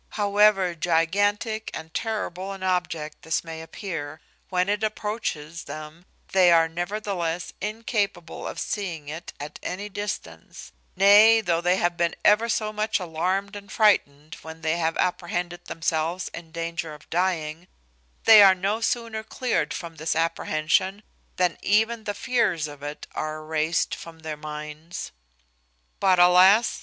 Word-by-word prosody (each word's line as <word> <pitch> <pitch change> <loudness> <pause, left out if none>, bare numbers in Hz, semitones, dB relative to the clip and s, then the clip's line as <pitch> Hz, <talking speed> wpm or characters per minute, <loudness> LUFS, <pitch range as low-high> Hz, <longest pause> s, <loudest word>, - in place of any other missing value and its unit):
However 205 -3 +4
gigantic 205 +7 0
and 160 0 -8
terrible 195 -4 -3
an 195 -1 -9
object 175 -4 -2
this 160 0 -1
may 165 -1 -7
appear 160 -3 -6 0.3
when 180 0 +1
it 205 +1 0
approaches 210 -7 -3
them, 155 +3 -9 0.3
they 185 -2 +5
are 165 -1 +5
nevertheless 175 0 -3
incapable 205 -4 -3
of - - -6
seeing 170 -8 -4
it 160 +3 -7
at 145 +1 -7
any 200 +3 -5
distance; 195 - -6 0.2
nay, 210 +4 +7
though 170 -5 0
they 180 +1 +3
have 175 -2 0
been 170 -1 +1
ever 220 +3 +5
so 215 -1 -1
much 215 0 0
alarmed 185 +4 -2
and 200 -1 -10
frightened 155 -8 +2
when 160 0 -10
they 160 +1 0
have 165 -1 0
apprehended 175 -1 -2
themselves 165 +2 -2
in 165 -1 -9
danger 165 -1 -4
of 150 - -17
dying, 170 -2 -1 0.6
they 220 -2 +9
are 195 -2 +8
no 200 +4 -1
sooner 230 -1 -1
cleared 245 +2 -1
from 165 -2 -6
this 160 +1 -1
apprehension 165 +4 0 0.3
than 180 -2 0
even 220 +2 +1
the 205 - -3
fears 205 -11 0
of 145 -1 -11
it 145 +1 -6
are 155 0 -3
erased 155 +1 -1
from 165 -1 -9
their 155 -1 -5
minds. 150 +2 -7 0.9
But, 190 -2 +4
alas! 185 +5 +6
175 Hz, 145 wpm, -25 LUFS, 160-205 Hz, 0.9 s, they